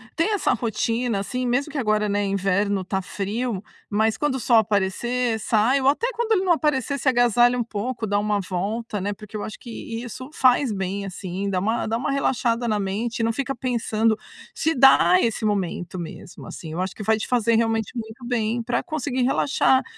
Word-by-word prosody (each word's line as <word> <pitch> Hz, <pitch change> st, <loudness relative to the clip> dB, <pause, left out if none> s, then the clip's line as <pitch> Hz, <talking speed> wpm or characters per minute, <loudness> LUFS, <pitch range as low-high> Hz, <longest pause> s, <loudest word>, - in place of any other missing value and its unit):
ter 330 Hz, +6 st, +1 dB
essa 405 Hz, -, +2 dB
rotina, 230 Hz, -1 st, -1 dB
assim, 250 Hz, +5 st, -3 dB
mesmo 275 Hz, +5 st, 0 dB
que 300 Hz, -, -5 dB
agora, 215 Hz, -4 st, +1 dB
né, 205 Hz, 0 st, +1 dB
inverno 195 Hz, 0 st, 0 dB
tá 190 Hz, +1 st, -2 dB
frio, 205 Hz, +2 st, -3 dB, 0.3 s
mas 220 Hz, +1 st, +1 dB
quando 295 Hz, -3 st, 0 dB
o -, -, -2 dB
sol 235 Hz, -1 st, +4 dB
aparecer, 220 Hz, +3 st, +1 dB
sai, 225 Hz, +5 st, +2 dB
ou 265 Hz, -, +1 dB
até 370 Hz, -, +3 dB
quando 460 Hz, 0 st, -2 dB
ele 380 Hz, -2 st, +2 dB
não 360 Hz, -, +4 dB
aparecer, 285 Hz, -3 st, 0 dB
se 265 Hz, -, -4 dB
agasalha 245 Hz, 0 st, +4 dB
um 240 Hz, -, +1 dB
pouco, 230 Hz, +1 st, -4 dB
dá 205 Hz, -, +1 dB
uma 210 Hz, 0 st, 0 dB
volta, 200 Hz, +4 st, -3 dB
né, 205 Hz, +2 st, -2 dB
porque 215 Hz, +1 st, -9 dB
eu -, -, -4 dB
acho 215 Hz, -, -7 dB
que 230 Hz, -1 st, -7 dB
isso 255 Hz, +2 st, -8 dB
faz 255 Hz, -1 st, +3 dB
bem, 195 Hz, 0 st, -3 dB
assim, 190 Hz, +1 st, -4 dB
dá 185 Hz, -2 st, 0 dB
uma 220 Hz, +5 st, 0 dB
dá 225 Hz, +1 st, 0 dB
uma 270 Hz, -, -2 dB
relaxada 245 Hz, -3 st, 0 dB
na 215 Hz, -2 st, +1 dB
mente, 210 Hz, +5 st, -2 dB
e -, -, +1 dB
não 230 Hz, -, +2 dB
fica 275 Hz, +1 st, -2 dB
pensando 230 Hz, -3 st, 0 dB, 0.4 s
se 320 Hz, +1 st, +1 dB
dar 275 Hz, +7 st, +6 dB
esse 225 Hz, -1 st, 0 dB
momento, 185 Hz, -3 st, -2 dB
mesmo, 170 Hz, +1 st, -9 dB
assim. 160 Hz, -2 st, -8 dB
Eu 180 Hz, -, -2 dB
acho 190 Hz, 0 st, -3 dB
que 215 Hz, -, -6 dB
vai 220 Hz, +1 st, +3 dB
te 215 Hz, -, -4 dB
fazer 230 Hz, -2 st, +2 dB
realmente 225 Hz, -1 st, +1 dB
muito 230 Hz, +1 st, -7 dB
bem, 235 Hz, -1 st, -1 dB
pra 240 Hz, +1 st, 0 dB
conseguir 285 Hz, -6 st, -2 dB
relaxar. 265 Hz, 0 st, +3 dB
225 Hz, 205 wpm, -23 LUFS, 205-250 Hz, 0.4 s, dar